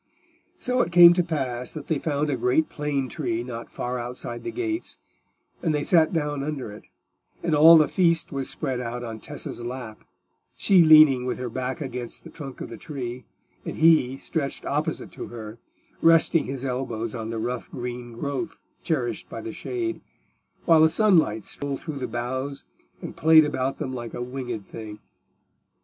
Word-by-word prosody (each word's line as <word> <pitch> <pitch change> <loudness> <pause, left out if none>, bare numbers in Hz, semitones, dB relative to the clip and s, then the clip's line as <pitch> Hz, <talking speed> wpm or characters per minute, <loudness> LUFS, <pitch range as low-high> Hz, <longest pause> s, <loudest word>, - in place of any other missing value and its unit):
So 250 0 +1
it 175 - -1
came 175 0 +9
to 180 - +2
pass 130 -7 -3
that 155 -3 -7
they 155 -4 -1
found 150 -1 -1
a - - +1
great 125 +6 +1
plane 145 -3 -2
tree 120 -5 -3
not 120 -1 -7
far 125 0 -4
outside 120 0 -5
the - - -3
gates, 340 -1 -3 0.6
and 160 -3 +1
they 145 - 0
sat 160 -2 +4
down 150 -4 -1
under 140 -6 -4
it, 105 - -13 0.6
and 170 -2 0
all 160 +3 +9
the 155 -2 +5
feast 170 -3 +2
was 135 -2 -1
spread 135 -5 -2
out 120 0 -4
on 115 -2 -6
Tessa's 145 -1 -5
lap, 120 -3 -7 0.5
she 190 -3 +5
leaning 155 -5 +7
with - - -2
her 125 -2 -5
back 130 +3 -3
against 125 -4 -5
the 165 - -11
trunk 140 -5 -9
of - - -6
the - - -7
tree, 125 -5 -6 0.4
and - - -5
he 155 -5 +4
stretched 140 -1 -3
opposite - - -2
to - - -7
her, 110 -1 -9 0.4
resting 165 0 +4
his 135 0 -5
elbows 120 -4 -3
on 115 -2 -5
the 115 - -3
rough 120 +2 -3
green 120 -1 -6
growth 140 +7 -4 0.2
cherished 130 -8 -2
by - - -6
the 345 - -6
shade, 345 -2 -4 0.6
while 165 -2 +6
the 160 - +6
sunlight 165 - +3
stole 140 -1 -3
through 155 -4 -6
the 130 - -3
boughs 130 +4 -4 0.4
and - - -6
played 160 0 +6
about 135 -2 -2
them 130 -4 -4
like 120 -2 -6
a - - -5
winged 125 -5 -5
thing. 110 -2 -8
135 Hz, 180 wpm, -25 LUFS, 120-160 Hz, 0.6 s, came